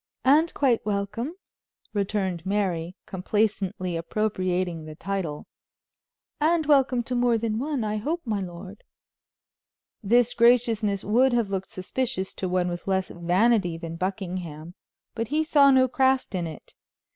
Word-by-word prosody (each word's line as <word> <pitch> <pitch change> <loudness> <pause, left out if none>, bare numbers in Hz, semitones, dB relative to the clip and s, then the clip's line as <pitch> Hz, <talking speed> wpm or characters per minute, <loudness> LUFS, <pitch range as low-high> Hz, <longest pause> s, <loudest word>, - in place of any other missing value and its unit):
"And 305 +5 +5
quite 255 -5 +2
welcome," 210 - -3 0.6
returned 195 -4 -1
Mary, 185 -3 -1
complacently 195 -2 -1
appropriating 180 -2 -1
the 155 0 -9
title, 175 -5 -4 0.9
"and 320 +1 +2
welcome 270 -4 +3
to 250 - -5
more 240 -1 +3
than 220 -1 -2
one, 280 -2 -2
I 215 0 -1
hope, 315 +11 -2
my 215 -3 -1
lord." 185 +2 -8 1.2
This 240 +3 +3
graciousness 230 -4 +3
would 245 +5 +3
have 230 -4 +1
looked 190 -1 -3
suspicious 190 +1 -3
to 185 - -4
one 180 0 +1
with 175 +1 -5
less 190 -1 0
vanity 180 +1 +2
than 165 -1 -6
Buckingham, 180 -3 -4 0.4
but 230 -1 -3
he 305 +5 +1
saw 290 -3 +5
no 260 -1 +5
craft 265 -2 +1
in 175 -3 -2
it. 155 - -11
205 Hz, 135 wpm, -25 LUFS, 185-245 Hz, 1.2 s, And